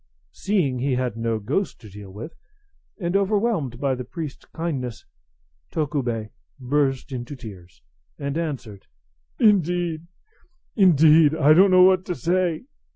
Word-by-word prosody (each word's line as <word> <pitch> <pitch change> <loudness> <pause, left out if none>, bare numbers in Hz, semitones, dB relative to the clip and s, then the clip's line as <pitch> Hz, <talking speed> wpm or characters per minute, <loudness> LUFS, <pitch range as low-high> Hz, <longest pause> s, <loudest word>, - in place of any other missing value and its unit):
Seeing 170 -11 -1
he 135 +1 0
had 125 -3 -2
no 115 0 -1
ghost 110 - -2
to 110 - -12
deal 100 0 -11
with, 110 - -9 0.7
and 175 -1 -2
overwhelmed 200 - 0
by 140 -1 0
the 125 0 -4
priest's 150 +3 -7
kindness, 130 -9 -5 0.6
Tokubei 130 -8 -2 0.3
burst 135 +1 -1
into 125 +2 -6
tears, 90 - -12 0.3
and 140 0 -4
answered, 135 -12 -5 0.5
"Indeed, 175 -5 +1 0.7
indeed, 160 - +5
I 155 -1 +5
don't 190 +5 +6
know 185 0 +6
what 185 0 +5
to 180 - -3
say. 175 -1 0
145 Hz, 130 wpm, -23 LUFS, 120-175 Hz, 0.7 s, don't